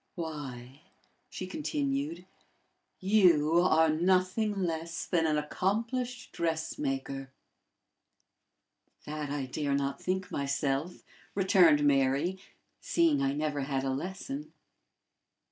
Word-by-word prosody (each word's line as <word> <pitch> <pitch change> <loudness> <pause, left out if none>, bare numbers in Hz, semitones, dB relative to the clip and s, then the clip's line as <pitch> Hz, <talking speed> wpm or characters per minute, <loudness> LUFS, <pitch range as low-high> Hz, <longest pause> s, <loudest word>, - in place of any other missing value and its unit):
"Why," 140 -5 -6 0.5
she 185 - -6
continued, 285 - -2 0.7
"you 175 -6 +4
are 160 -2 +4
nothing 185 +5 +1
less 165 -1 -3
than 165 -3 +1
an 155 -1 +2
accomplished 230 - -2
dressmaker!" 135 -5 -3 1.7
"That 150 -1 -4
I 140 -1 -2
dare 140 +2 -1
not 140 0 -2
think 185 0 -2
myself," 140 +3 -1 0.3
returned 185 -6 +5
Mary, 140 +6 +2 0.4
"seeing 335 -3 +2
I 135 0 +1
never 150 -1 -1
had 135 -1 -1
a 135 - 0
lesson." 190 - -5
160 Hz, 95 wpm, -30 LUFS, 140-190 Hz, 1.7 s, returned